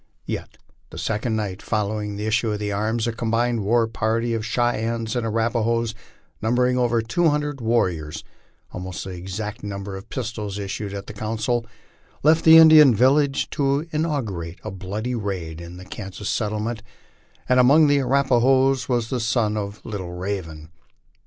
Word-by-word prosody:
Yet - - -5 0.3
the - - -10
second 110 +1 -1
night 105 -3 -3
following 105 -1 -2
the 105 +1 -4
issue 110 +1 +1
of 105 -1 -2
arms, 110 +3 -1
a 120 - 0
combined 115 0 0
war 115 +3 +3
party 115 +2 -1
of 115 -1 -2
Cheyennes 115 -1 -1
and 120 -2 -1
Arapahoes, 115 0 0 0.5
numbering 125 +3 +2
over 120 -2 +1
two 160 +9 +2
hundred 145 -2 -2
warriors, 90 -10 0 0.5
almost 90 0 -6
the 95 - -7
exact 95 +4 -6
number 100 -1 -5
of 95 +4 -10
pistols 105 -5 -4
issued 100 0 -4
at 100 - -6
the - - -9
council, 110 +2 -2 0.6
left 155 +2 +4
the 160 0 +10
Indian 155 -6 +8
village 135 +4 +3
to 140 +2 0
inaugurate 115 - -2
a - - -5
bloody 105 +6 -4
raid 90 -8 -4
in 85 +1 -9
the 95 - -10
Kansas 95 +2 -7
settle 105 -1 -1
ments; 115 0 -3 0.7
and 125 0 +4
among 140 +5 +6
the 145 -1 +4
Arapahoes 135 0 +3
was 120 -2 0
the 130 - 0
son 110 -2 +1
of 100 0 -5
Little 95 -6 -5
Raven. 90 -4 -5
110 Hz, 160 wpm, -23 LUFS, 100-125 Hz, 0.7 s, the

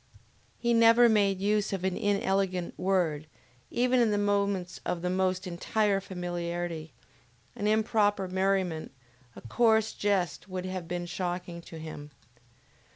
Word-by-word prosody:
He 235 -1 +1
never 230 +1 +6
made 200 -4 +3
use 210 +1 +1
of 195 -2 -3
an 190 -1 0
inelegant 195 -3 0
word, 175 -5 0 0.4
even 250 +1 +2
in 235 -2 +4
the 205 - +1
moments 200 -3 0
of 170 -1 -3
the 180 - 0
most 185 0 0
entire 195 +3 0
familiarity; 175 -3 -4 0.6
an 205 - -2
improper 210 -2 +2
merriment, 185 -3 0 0.4
a - - -10
coarse 220 - +2
jest 190 -4 -1
would 185 -1 -4
have 185 -2 -5
been 175 0 -3
shocking 175 -1 -4
to 165 - -11
him. 155 -2 -8
190 Hz, 135 wpm, -29 LUFS, 175-205 Hz, 0.6 s, never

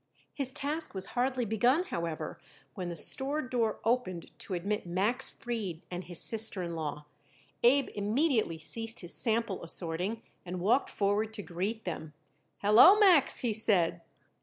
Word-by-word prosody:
His 270 -3 +1
task 295 0 -3
was 190 0 0
hardly 250 0 0
begun, 240 - +2
however, 170 - -5 0.3
when 180 -3 -5
the 170 - -5
store 275 - +1
door 245 -6 -1
opened 225 -8 -1
to 185 - -5
admit 200 +3 -3
Max 210 +9 0
Fried 210 -9 -5
and 180 0 -5
his 175 -1 -4
sister 220 -4 +5
in 170 -1 -5
law. 150 -2 -5 0.6
Abe 270 +3 +4
immediately 215 - 0
ceased 225 +8 -3
his 175 -1 -1
sample 225 -5 0
assorting 180 +6 -3 0.2
and 180 0 -6
walked 220 +9 +1
forward 205 +2 -1
to 205 - -6
greet 195 +7 -4
them. 160 -3 -6 0.5
"Hello, 225 - +7
Max," 365 -10 +4
he 235 -3 0
said. 190 -6 +2
215 Hz, 150 wpm, -30 LUFS, 175-245 Hz, 0.6 s, Hello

